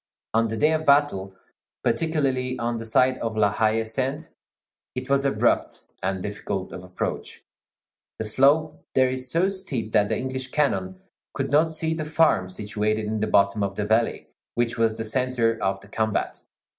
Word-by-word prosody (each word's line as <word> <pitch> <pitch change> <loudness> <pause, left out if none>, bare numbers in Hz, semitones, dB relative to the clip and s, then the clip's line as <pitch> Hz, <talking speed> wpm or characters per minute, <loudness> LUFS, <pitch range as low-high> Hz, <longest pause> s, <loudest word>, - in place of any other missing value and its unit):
On 115 +1 +3
the 115 0 -4
day 150 +5 +4
of 155 0 0
battle, 140 -11 +2 0.5
particularly 135 -6 0
on 120 0 -1
the 115 0 -5
side 130 +3 +3
of 110 -1 -3
La 105 -2 +4
Haie 110 0 +2
Sainte, 135 +7 -3 0.7
it 130 +2 -4
was 140 0 +3
abrupt 140 - 0
and 95 0 -2
difficult 100 -2 -4
of 90 - -7
approach. 90 0 -5 0.7
The 110 - -3
slope 140 +8 +2
there 130 -1 +4
is 130 0 -3
so 170 +7 +2
steep 170 - -4
that 105 -2 +3
the - - 0
English 130 0 -4
cannon 95 -11 0 0.4
could - - -2
not 160 +2 +3
see 160 0 0
the 160 -1 -3
farm, 150 - +2
situated 105 +2 -2
in 110 +1 -2
the 110 - 0
bottom 100 +1 +3
of 100 -1 -1
the 105 - -2
valley, 110 +2 +1 0.3
which 120 -1 0
was 115 -1 +1
the 115 - -3
centre 120 0 0
of 95 0 0
the 100 - -14
combat. 110 0 -2
115 Hz, 175 wpm, -25 LUFS, 105-140 Hz, 0.7 s, day